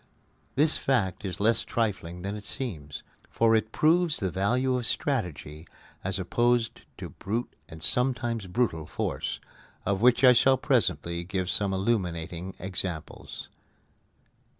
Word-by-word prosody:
This 150 +3 +3
fact 120 -10 0
is 95 -3 -4
less 110 +3 +3
trifling 90 -6 -2
than 100 +1 -3
it 105 - -7
seems; 80 - -5 0.3
for 115 0 +3
it 110 0 0
proves 165 +2 +3
the 95 -3 -1
value 125 +8 +1
of 125 -2 -1
strategy 85 - -2 0.4
as 95 0 -1
opposed 120 +5 +1 0.2
to - - -6
brute 115 +5 -4 0.2
and 80 +1 -10
sometimes 120 -4 0
brutal 90 -7 0
force, - - -3 0.5
of 100 0 0
which 125 +2 +5
I 125 -1 +9
shall 130 +2 +5
presently 85 -6 0
give 95 0 -2
some 100 -2 +2
illuminating 95 -3 -2
examples. 90 -3 -5
100 Hz, 130 wpm, -28 LUFS, 90-120 Hz, 0.5 s, I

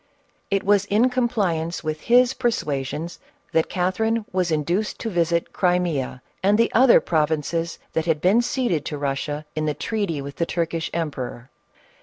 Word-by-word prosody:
It 195 -1 +1
was 200 0 +3
in 220 +5 +3
compliance 195 -11 0
with 155 -1 -3
his 245 +1 +4
persuasions 165 - -2 0.3
that 160 - +1
Cathe 185 +1 -1
rine 225 0 +1
was 180 -1 0
induced 170 +7 0
to 225 - -3
visit 170 -1 0
Crimea 175 - 0 0.2
and 200 +2 +3
the 230 - +2
other 250 0 +7
provinces 160 +1 -1 0.2
that 160 +1 -1
had 160 -2 +2
been 195 +8 +4
ceded 240 - 0
to 150 - -4
Russia 145 +2 -3
in 155 0 -1
the 150 - 0
treaty 200 -3 -2
with 140 +1 -7
the 170 - 0
Turkish 165 -1 -2
emperor. 130 -6 -4
170 Hz, 160 wpm, -23 LUFS, 155-205 Hz, 0.3 s, other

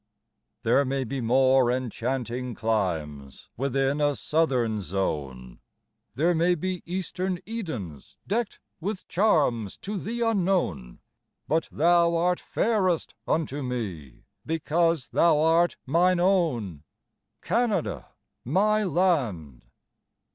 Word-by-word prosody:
There 120 +4 +4
may 135 0 -1
be 130 +2 -4
more 130 +1 +4
enchanting 125 0 -3
climes 80 -12 -3
Within 135 +2 0
a 145 -1 +2
southern 125 -11 0
zone; 70 -10 -4 0.6
There 165 +6 +2
may 175 +2 +2
be 185 +2 -3
eastern 185 +1 -2
Edens 130 - -6
deckt 220 +2 -2 0.2
With 195 +3 -4
charms 145 - +1
to 205 0 -5
thee 235 +4 -3
unknown; 180 - 0 0.5
But 160 +1 0
thou 170 +1 +3
art 175 +1 +1
fairest 190 -7 0
unto 145 -3 -1
me, 100 - -5 0.2
Because 165 -3 0
thou 165 +4 +4
art 165 +2 +3
mine 175 +6 +3
own, 155 - +1 0.6
Canada, 225 -6 0 0.4
my 210 - +2
land. 130 - 0
145 Hz, 105 wpm, -26 LUFS, 115-180 Hz, 0.6 s, There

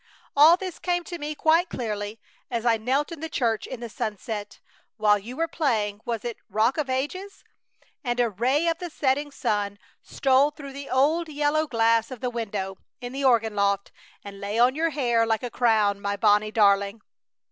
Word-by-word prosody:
All 310 +4 +8
this 370 -3 -6
came 350 -1 -1
to 345 0 -7
me 300 0 -4
quite 325 +4 +3
clearly 210 -2 -4 0.3
as 235 -1 -3
I 230 -1 +4
knelt 265 +8 0
in 330 - -7
the 320 +1 -5
church 230 -7 -1
in 250 -2 -7
the 235 - -4
sunset, 215 -2 -5 0.4
while 210 -1 +4
you 240 +6 -9
were 330 +1 0
playing 220 -11 -1
was 230 -1 -3
it 235 -2 -4
"Rock 230 +7 +1
of 285 -3 -2
Ages"? 330 +10 -3 0.6
and 240 -2 -1
a 240 - +4
ray 260 - +1
of 330 0 0
the 355 - -5
setting 290 -1 0
sun 205 -6 -2 0.2
stole 270 +1 +2
through 285 -2 -10
the 280 0 -8
old 310 +6 +2
yellow 300 +1 +1
glass 230 -2 +2
of 255 -3 -8
the 250 +1 -2
window 200 -5 -4 0.2
in 245 -1 -7
the 275 +1 -3
organ 225 -5 +3
loft 200 -1 0 0.3
and 200 -1 -10
lay 205 +2 -3
on 245 +2 +5
your 325 +3 0
hair 245 -6 +1
like 225 +1 0
a 245 - -4
crown, 215 -4 +2
my 200 0 -2
Bonnie 210 0 +3
darling! 200 0 +2
240 Hz, 190 wpm, -25 LUFS, 215-290 Hz, 0.6 s, All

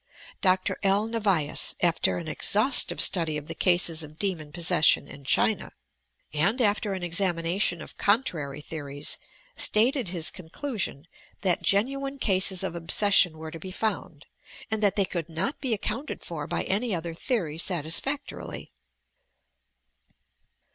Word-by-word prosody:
Dr. 185 -1 +1
L. 200 +2 +3
Nevius, 205 -10 0
after 170 -1 +2
an 170 - -6
exhaustive 215 - +1
study 160 -4 +3
of 150 - -7
the - - -6
cases 175 -3 +3
of 155 0 -10
demon 165 -7 -2
possession 170 -3 +3
in 140 - -12
China, 200 +9 +1 0.6
and 200 - +2
after 210 -3 +2
an 185 -2 -5
examination 175 0 0
of - - -11
con 215 +6 +3
trary 150 - -5
theories, 145 -2 -3 0.4
stated 235 0 +3
his 170 -2 +1
conclusion 185 - -5 0.4
that 180 -3 +1
genuine 275 +7 0
cases 190 -5 +5
of - - -3
obsession 170 0 +3
were 160 0 -8
to 165 - -8
be 185 - -8
found, 185 -6 -3 0.5
and 220 -1 0
that 205 -2 +3
they 200 - +3
could 170 -3 -5
not 185 - -3
be 265 -4 0
accounted 235 +7 -3
for - - -5
by - - -2
any 210 +2 0
other 165 0 -5
theory 165 - -2
satisfactorily. 180 - -2
185 Hz, 140 wpm, -26 LUFS, 160-210 Hz, 0.6 s, cases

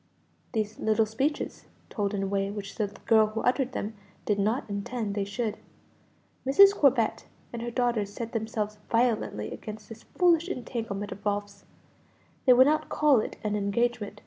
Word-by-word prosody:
These 215 -2 -2
little 220 0 +2
speeches 265 +8 -2 0.3
told 205 -1 -1
in 195 - -1
a - - -1
way 195 0 0
which 200 -1 -6
the 210 - -1 0.2
girl 220 -1 +5
who 215 +1 -4
uttered 260 +1 +1
them 215 -1 -3 0.3
did 205 -1 +1
not 220 +6 0
intend 210 +1 -3
they 200 -1 -1
should. 210 +2 -3 0.9
Mrs. 395 +10 +7
Corbet 265 - +2 0.3
and 235 - -4
her 240 - -3
daughters 235 -4 0
set 230 +2 -6
themselves 215 -2 -3
violently 230 - 0
against 215 -1 -8
this 225 0 -10
foolish 345 -1 +2
entanglement 225 - -4
of 200 - -8
Ralph's; 205 -1 -3 0.8
they 250 - +9
would 255 +1 +7
not 310 +1 +1
call 295 -5 +4
it - - -4
an 210 -1 -1
engagement. 210 +1 -1
220 Hz, 165 wpm, -28 LUFS, 205-245 Hz, 0.9 s, they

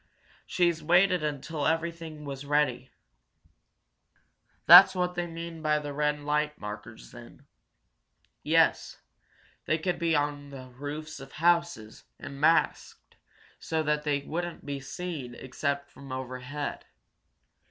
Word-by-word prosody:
She's 170 -2 +1
waited 180 +3 +4
until 150 0 -3
everything 165 -1 -3
was 140 -1 -6
ready." 140 -3 0 1.8
"That 185 +3 +10
what 180 -1 0
they 175 -1 -3
mean 165 -1 -7
by 155 -1 +2
the 145 -1 -5
red 150 0 0
light 150 +1 -1
markers, 105 - -9
then?" - - -14 1.0
"Yes. - - +2 0.7
They 155 - +1
could 175 +2 -2
be 165 -1 +1
on 145 -1 -1
the 130 -2 -10
roofs 145 +4 -7
of 135 0 -12
houses, 170 -9 0
and 140 0 -9
masked, 165 +2 +1 0.4
so 160 -1 -2
that 150 0 0
they 145 -2 -1
wouldn't 175 +4 -5
be 140 -1 -4
seen 135 -3 -6
except 140 +2 -3
from 140 -1 -12
overhead. 130 +2 -5
150 Hz, 120 wpm, -28 LUFS, 140-165 Hz, 1.8 s, That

